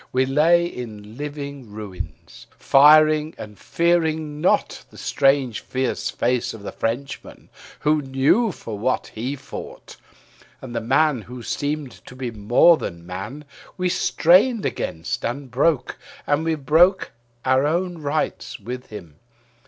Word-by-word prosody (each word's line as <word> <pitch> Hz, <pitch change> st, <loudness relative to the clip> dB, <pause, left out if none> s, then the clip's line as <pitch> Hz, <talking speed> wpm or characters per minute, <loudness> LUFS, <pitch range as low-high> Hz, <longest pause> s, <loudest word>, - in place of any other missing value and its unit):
We 130 Hz, +1 st, +2 dB
lay 160 Hz, +6 st, +4 dB
in 110 Hz, -8 st, -8 dB
living 140 Hz, -3 st, -7 dB
ruins; 95 Hz, -7 st, -9 dB
firing 155 Hz, +2 st, +5 dB
and 105 Hz, -2 st, -10 dB
fearing 160 Hz, -3 st, 0 dB
not 180 Hz, -, +1 dB
The -, -, -17 dB
strange 135 Hz, -4 st, +1 dB
face 125 Hz, -2 st, -1 dB
of 105 Hz, -, -12 dB
the -, -, -5 dB
Frenchman 130 Hz, +4 st, -5 dB, 0.3 s
who 150 Hz, 0 st, +2 dB
know 140 Hz, -, +2 dB
for 110 Hz, -, -8 dB
what 130 Hz, +4 st, -1 dB
they 125 Hz, +6 st, -3 dB
fought, 140 Hz, 0 st, -10 dB, 0.6 s
And 120 Hz, -3 st, -9 dB
the 115 Hz, -, -1 dB
man 135 Hz, +2 st, +2 dB
who 125 Hz, +2 st, -10 dB
seemed 145 Hz, +1 st, -3 dB, 0.2 s
to 125 Hz, -, -11 dB
be 130 Hz, -2 st, -4 dB
more 115 Hz, +10 st, +5 dB
than 85 Hz, -, -7 dB
man 100 Hz, +12 st, -7 dB, 0.3 s
we 180 Hz, -1 st, 0 dB
strained 195 Hz, +8 st, +3 dB
against 80 Hz, +1 st, -3 dB
and 130 Hz, +2 st, -4 dB
broke; 135 Hz, 0 st, +1 dB, 0.3 s
And 145 Hz, +2 st, +1 dB
we 165 Hz, -1 st, +1 dB
broke 160 Hz, +6 st, +3 dB, 0.3 s
our 130 Hz, +2 st, +3 dB
own 175 Hz, +2 st, -1 dB
right 150 Hz, +1 st, -2 dB
with 125 Hz, +1 st, -7 dB
him. 85 Hz, -8 st, -11 dB
135 Hz, 135 wpm, -22 LUFS, 120-155 Hz, 0.6 s, firing